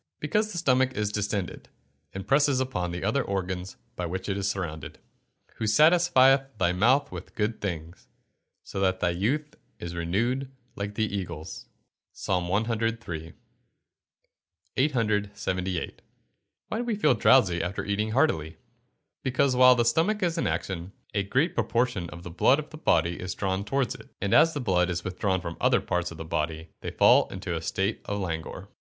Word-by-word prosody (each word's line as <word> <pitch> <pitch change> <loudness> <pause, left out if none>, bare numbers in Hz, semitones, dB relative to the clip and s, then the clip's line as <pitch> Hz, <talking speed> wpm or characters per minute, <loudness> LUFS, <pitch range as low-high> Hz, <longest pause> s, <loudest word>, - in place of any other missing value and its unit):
_ - - -58
Because 210 +8 0
the 180 - -6
stomach 130 -5 +2
is 105 -1 0
distended, 105 -3 -3 0.4
and 95 +1 -7
presses 140 -1 +3
upon 130 -10 -2
the 85 +1 -5
other 115 +7 +1
organs 95 -1 -4 0.2
by 90 - -3
which 95 +2 -4
it 100 - -1
is 100 0 -1
surrounded. 80 -6 -4
[Verse: - - -37
"Who 110 - -2
satisfieth 135 -1 +4
thy 90 -2 +2
mouth 130 +9 +3
with - - -9
good 105 +1 -1
things; 85 -4 -5 0.6
so - - -6
that 95 -1 +1
thy 85 - +1
youth 135 - -1 0.2
is 85 0 -6
renewed 115 +11 -1 0.2
like 100 +1 -5
the 110 - +1
eagles." 85 -6 -6 0.5
PSALM 90 -2 -1 0.2
CIII.] 115 -8 -3 1.4
878. 105 - -1 0.7
Why 220 - -2
do - - -1
we 235 -3 -1
feel 205 -10 +3
drowsy 110 -7 +4
after 90 +3 -3
eating 105 +2 -1
heartily? 80 - +1 0.6
Because, 130 0 +1
while 125 0 +7
the 120 -1 +2
stomach 170 - +2
is 170 -2 +1
in 165 - 0
action, 95 0 -3 0.2
a 100 - +1
great 130 - +1
proportion 115 -8 0
of 85 - -10
the 90 - -7
blood 90 +10 +4
of 155 0 -6
the 155 - -9
body 85 - +2
is 90 0 -4
drawn 95 0 -1
towards 130 +5 0
it, - - -13
and 100 -1 -1
as 165 +1 +5
the - - -1
blood 90 -7 +1
is 90 -1 -2
withdrawn 95 +1 -1
from 85 -1 -5
the - - -11
other - - +4
parts 90 0 -2
of 85 - -10
the 80 - -6
body, 80 0 -3
they - - -5
fall - - +5
into - - -4
a - - -3
state 100 +3 -1
of 100 - -2
languor. 80 -5 -4
100 Hz, 175 wpm, -27 LUFS, 90-130 Hz, 1.4 s, while